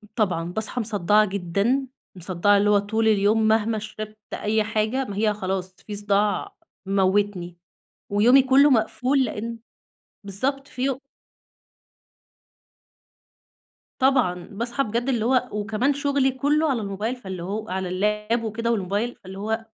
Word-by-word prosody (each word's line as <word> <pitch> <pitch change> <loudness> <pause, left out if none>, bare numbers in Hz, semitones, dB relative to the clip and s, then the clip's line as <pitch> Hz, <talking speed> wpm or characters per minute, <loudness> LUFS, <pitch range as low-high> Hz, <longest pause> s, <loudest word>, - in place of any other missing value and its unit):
طبعًا 185 -7 0
باصحي 220 +4 -1
مصدعة 210 -1 +2
جدًا، 200 +8 0 0.3
مصدعة 185 +3 +2
اللي 205 +1 +2
هو 205 -1 +5
طول 220 +2 0
اليوم 215 +1 +3
مهما 220 0 +2
شربت 215 0 -8 0.2
أي 215 +1 0
حاجة 220 +5 -1
ما 200 - -6
هي 215 0 +2
خلاص 190 -2 -4
في 210 - -4
صداع 205 - 0 0.3
مموتني 190 -2 0 0.5
ويومي 235 +7 +5
كله 270 +2 +5
مقفول، 255 +3 +2
لأن 230 0 -5 0.7
بالضبط 270 +8 -2
في 255 0 -6
يو 265 0 0 3.0
طبعًا، 250 -10 +2
باصحي 235 +6 -2
بجد 235 +3 -2
اللي 235 -4 0
هو، 250 0 +2
وكمان 215 +6 0
شغلي 280 -1 +1
كله 295 +4 +1
على 250 -5 0
الموبايل 205 +4 -3
فاللي 190 -8 -7
هو 210 +4 -4
على 185 0 -3
اللاب 210 +5 0
وكده 230 +1 -2
والموبايل، 210 +3 -1
فاللي 190 0 -11
هو 220 +2 -2
215 Hz, 135 wpm, -24 LUFS, 200-245 Hz, 3.0 s, هو